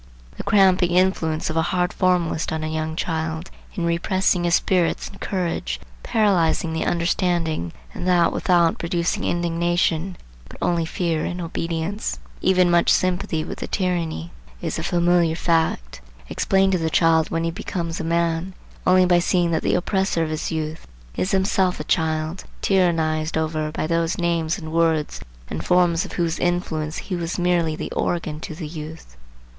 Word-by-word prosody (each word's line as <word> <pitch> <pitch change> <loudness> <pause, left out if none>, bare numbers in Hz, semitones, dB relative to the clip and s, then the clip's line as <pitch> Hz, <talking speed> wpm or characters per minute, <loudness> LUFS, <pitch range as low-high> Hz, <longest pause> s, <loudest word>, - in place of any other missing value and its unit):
The - - -5
cramping 190 -3 +4
influence 170 -4 +1
of 160 - -3
a - - +4
hard 180 +1 0
formalist 180 -3 +1
on 160 0 -2
a - - -1
young 155 0 -3
child, 160 +1 -3 0.2
in 175 -5 -1
repressing 175 +1 +1
his 170 -1 +4
spirits 180 -3 +1
and - - -13
courage, 170 - -2 0.2
paralyzing 175 - +2
the 160 - -1
understanding, 170 - 0 0.2
and - - -4
that 175 -2 +4
without 170 -2 +2
producing 170 0 -1
indignation, 175 +1 0 0.3
but - - -12
only 170 -1 +1
fear 165 -1 -1
and 180 - -3
obedience, 170 +4 -3
and - - -19 0.2
even 180 -2 +4
much 170 0 +4
sympathy 180 -3 +1
with - - -7
the - - -4
tyranny,—is 85 - -3
a - - -3
familiar 175 -1 +2
fact, 160 - 0 0.3
explained 195 0 +2
to 185 - +1
the 160 -1 0
child 160 -1 +3
when 165 0 -1
he 165 - 0
becomes 170 0 -4
a - - -3
man, 170 +2 0 0.3
only 185 0 +6
by 175 -1 +4
seeing 175 0 +1
that 160 - +1
the - - +1
oppressor 190 -1 0
of 155 - -3
his 155 +2 -3
youth 160 0 -4 0.3
is 185 - -1
himself 190 -1 +1
a - - -3
child 160 +1 -1 0.2
tyrannized 160 -4 +1
over 155 -1 -1
by 155 - -2
those 165 +1 0
names 170 -2 0
and 160 -3 -7
words 165 -2 +1 0.3
and 80 - -5
forms 175 - +3
of - - -9
whose 170 -2 -1
influence 160 -3 -1
he 185 - -4
was 170 0 -3
merely 175 -3 +1
the - - -5
organ 155 -3 -2
to 160 - -7
the 160 -2 -6
youth. 155 - -9
170 Hz, 165 wpm, -22 LUFS, 160-180 Hz, 0.3 s, only